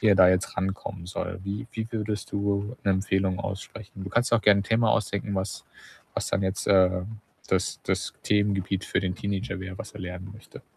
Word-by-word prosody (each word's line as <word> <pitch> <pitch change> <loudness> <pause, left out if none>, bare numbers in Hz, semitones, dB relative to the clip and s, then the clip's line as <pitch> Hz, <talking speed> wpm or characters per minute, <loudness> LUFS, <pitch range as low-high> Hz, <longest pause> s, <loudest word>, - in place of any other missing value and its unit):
wie 110 - +4
er 100 - +6
da 90 -1 +8
jetzt 90 0 +1
rankommen 95 -1 -3
soll.” 95 0 -4
Wie 100 +3 -3
wie 110 0 -3
würdest 105 -2 -3
du 100 +3 0
'ne 100 - +4
Empfehlung 95 0 +1
aussprechen? 100 0 -6
Du 95 - -6
kannst 120 +2 +2
dir 115 - +8
auch 110 - -2
gern 100 -1 +7
'n - - -2
Thema 115 +1 +3
ausdenken, 100 -2 0
was 95 0 -3 0.5
was - - -1
dann 100 - +1
jetzt, 95 0 -1
äh, 95 -2 +5 0.5
das - - +1
das - - 0
Themengebiet 100 -2 +1
für - - 0
den 90 -2 -1
Teenager 100 -1 -3
wär, 95 0 -6
was 105 - -7
er 105 - -9
lernen 90 +1 -6
möchte. 110 - -13
100 Hz, 205 wpm, -27 LUFS, 95-105 Hz, 0.5 s, da